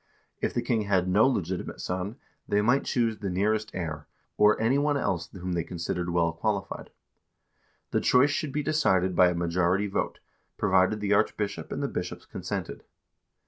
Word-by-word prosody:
If -, -, -1 dB
the -, -, 0 dB
king 115 Hz, -2 st, +1 dB
had 95 Hz, -3 st, +1 dB
no 105 Hz, +6 st, +5 dB
legitimate 95 Hz, -8 st, -2 dB
son, 90 Hz, +4 st, -3 dB, 0.3 s
they 105 Hz, 0 st, +2 dB
might 125 Hz, +5 st, +3 dB
choose 115 Hz, -3 st, 0 dB
the 100 Hz, -, -3 dB
nearest 105 Hz, +4 st, 0 dB
heir, 80 Hz, -4 st, -4 dB, 0.3 s
or 105 Hz, 0 st, +4 dB
any 120 Hz, +5 st, +2 dB
one 145 Hz, 0 st, +2 dB
else 85 Hz, -10 st, -1 dB
whom 90 Hz, -1 st, -5 dB
they 85 Hz, -1 st, 0 dB
considered 85 Hz, 0 st, -3 dB
well 85 Hz, -1 st, +1 dB
qualified. 100 Hz, +2 st, -3 dB, 1.0 s
The -, -, +1 dB
choice 130 Hz, +3 st, +4 dB
should 150 Hz, -1 st, -2 dB
be 150 Hz, +1 st, -1 dB
decided 95 Hz, -, +2 dB
by 90 Hz, +1 st, +6 dB
a 90 Hz, -, -2 dB
majority 85 Hz, +3 st, +1 dB
vote, 100 Hz, -, -2 dB, 0.4 s
provided 95 Hz, +1 st, +2 dB
the 105 Hz, 0 st, +1 dB
archbishop 100 Hz, -4 st, 0 dB
and -, -, -3 dB
the -, -, +1 dB
bishops -, -, -5 dB
consented. -, -, -5 dB
100 Hz, 170 wpm, -27 LUFS, 90-110 Hz, 1.0 s, by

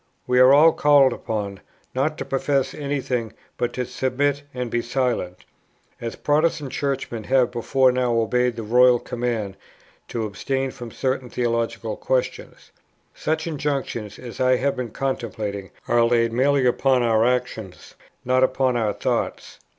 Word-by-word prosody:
We 125 Hz, 0 st, +2 dB
are 140 Hz, +6 st, +7 dB
called 145 Hz, -4 st, +4 dB
upon, 100 Hz, -4 st, -4 dB, 0.3 s
not 150 Hz, +4 st, 0 dB
to -, -, -4 dB
profess 135 Hz, 0 st, 0 dB
any 145 Hz, -1 st, -3 dB
thing, 120 Hz, -5 st, -3 dB, 0.2 s
but 120 Hz, 0 st, -1 dB
to 125 Hz, -, -2 dB
submit 135 Hz, +3 st, -1 dB
and 125 Hz, -2 st, -4 dB
be 120 Hz, -, +1 dB
silent, 120 Hz, -8 st, -2 dB, 0.6 s
as 115 Hz, -1 st, -4 dB
Protestant 150 Hz, -2 st, 0 dB
Churchmen 130 Hz, -6 st, -3 dB
have 130 Hz, -2 st, +3 dB
before 130 Hz, +2 st, +2 dB
now 125 Hz, -1 st, 0 dB
obeyed 125 Hz, +1 st, +1 dB
the 115 Hz, -, -5 dB
royal 125 Hz, +3 st, +5 dB
command 115 Hz, -5 st, -3 dB, 0.5 s
to 115 Hz, -2 st, -3 dB
abstain 135 Hz, +6 st, -2 dB
from 120 Hz, -2 st, -9 dB
certain 130 Hz, +1 st, -2 dB
theological 115 Hz, -2 st, -2 dB
questions. 130 Hz, -1 st, -3 dB, 0.4 s
Such 160 Hz, +1 st, -2 dB
injunctions 140 Hz, -, -3 dB
as 120 Hz, -2 st, -9 dB
I 130 Hz, 0 st, +4 dB
have 140 Hz, +2 st, 0 dB
been 125 Hz, -2 st, -4 dB
contemplating 105 Hz, -6 st, -4 dB, 0.2 s
are 120 Hz, 0 st, +4 dB
laid 115 Hz, -1 st, +2 dB
merely 135 Hz, +2 st, +2 dB
upon 125 Hz, 0 st, +3 dB
our 115 Hz, -1 st, +3 dB
actions, 125 Hz, -6 st, -2 dB, 0.3 s
not 130 Hz, +1 st, +3 dB
upon 130 Hz, -1 st, +2 dB
our 110 Hz, -3 st, 0 dB
thoughts. -, -, -3 dB
125 Hz, 145 wpm, -23 LUFS, 115-135 Hz, 0.6 s, are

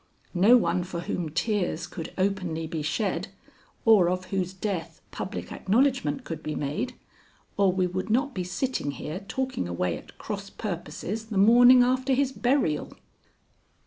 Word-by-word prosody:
No 200 Hz, +7 st, +6 dB
one 175 Hz, -4 st, +1 dB
for 175 Hz, -1 st, -5 dB
whom 175 Hz, -2 st, -3 dB
tears 175 Hz, -1 st, -1 dB
could 170 Hz, -2 st, -7 dB
openly 185 Hz, -4 st, -1 dB
be 160 Hz, -1 st, -4 dB
shed 160 Hz, +7 st, -1 dB, 0.6 s
or 210 Hz, -6 st, +6 dB
of 185 Hz, 0 st, -2 dB
whose 185 Hz, -2 st, 0 dB
death 180 Hz, -4 st, -4 dB
public 200 Hz, +3 st, -5 dB
acknowledgment 260 Hz, +5 st, +1 dB
could 165 Hz, -7 st, -6 dB
be 155 Hz, -1 st, -4 dB
made, 205 Hz, -, -3 dB, 0.6 s
or 200 Hz, -2 st, +4 dB
we 185 Hz, 0 st, +1 dB
would 185 Hz, +3 st, -3 dB
not 265 Hz, +5 st, +1 dB
be 185 Hz, -, -2 dB
sitting 185 Hz, -, -2 dB
here 150 Hz, +6 st, -5 dB
talking 255 Hz, -, -3 dB
away 85 Hz, 0 st, -1 dB
at -, -, -12 dB
cross 200 Hz, -2 st, -5 dB
purposes 195 Hz, +3 st, -5 dB
the 215 Hz, -3 st, -3 dB
morning 245 Hz, +5 st, +8 dB
after 255 Hz, +2 st, +1 dB
his 270 Hz, 0 st, +1 dB
burial." 245 Hz, -, 0 dB
190 Hz, 150 wpm, -27 LUFS, 170-235 Hz, 0.6 s, morning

